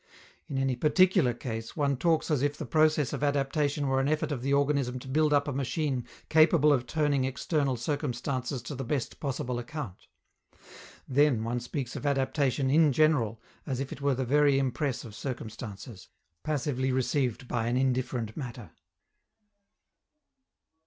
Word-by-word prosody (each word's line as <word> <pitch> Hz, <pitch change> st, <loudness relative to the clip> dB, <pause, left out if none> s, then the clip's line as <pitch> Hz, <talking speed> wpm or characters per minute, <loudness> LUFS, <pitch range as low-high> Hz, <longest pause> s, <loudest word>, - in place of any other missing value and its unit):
In 135 Hz, -, -4 dB
any 135 Hz, -1 st, +1 dB
particular 175 Hz, +1 st, +4 dB
case 115 Hz, 0 st, -6 dB
one 140 Hz, -2 st, +1 dB
talks 165 Hz, +4 st, +1 dB
as 145 Hz, -4 st, +2 dB
if 145 Hz, +1 st, 0 dB
the 155 Hz, -, -5 dB
process 155 Hz, +1 st, +2 dB
of -, -, -3 dB
adaptation 145 Hz, +1 st, 0 dB
were 135 Hz, 0 st, +2 dB
an 135 Hz, -, +1 dB
effort 155 Hz, 0 st, 0 dB
of 135 Hz, -4 st, -3 dB
the 135 Hz, +2 st, -1 dB
organism 140 Hz, -3 st, +1 dB
to 130 Hz, -, -10 dB
build 150 Hz, +3 st, +2 dB
up 145 Hz, 0 st, +3 dB
a -, -, -1 dB
machine 135 Hz, -1 st, -2 dB, 0.2 s
capable 155 Hz, -1 st, +5 dB
of 125 Hz, -3 st, 0 dB
turning 145 Hz, -4 st, +1 dB
external 135 Hz, 0 st, 0 dB
circumstances 130 Hz, -1 st, -3 dB
to 145 Hz, -, -6 dB
the 135 Hz, 0 st, -4 dB
best 135 Hz, 0 st, -3 dB
possible 130 Hz, -3 st, -3 dB
account: 120 Hz, -, -7 dB, 1.0 s
then 135 Hz, -4 st, +3 dB
one 120 Hz, +2 st, -1 dB
speaks 125 Hz, +1 st, -5 dB
of 145 Hz, -, -3 dB
adaptation 135 Hz, -1 st, +1 dB
in 155 Hz, 0 st, +5 dB
general 130 Hz, -7 st, +2 dB, 0.3 s
as 130 Hz, -3 st, -2 dB
if 135 Hz, 0 st, -4 dB
it 140 Hz, -, -7 dB
were 140 Hz, -1 st, +2 dB
the 130 Hz, +1 st, -2 dB
very 145 Hz, +1 st, +4 dB
impress 135 Hz, 0 st, -1 dB
of 110 Hz, -, -10 dB
circumstances, 110 Hz, -4 st, -7 dB, 0.3 s
passively 135 Hz, -3 st, -1 dB
received 130 Hz, -1 st, 0 dB
by 115 Hz, -2 st, -1 dB
an 120 Hz, +1 st, +1 dB
indifferent 125 Hz, -4 st, -1 dB
matter. 120 Hz, -5 st, -7 dB
135 Hz, 160 wpm, -29 LUFS, 125-145 Hz, 1.0 s, capable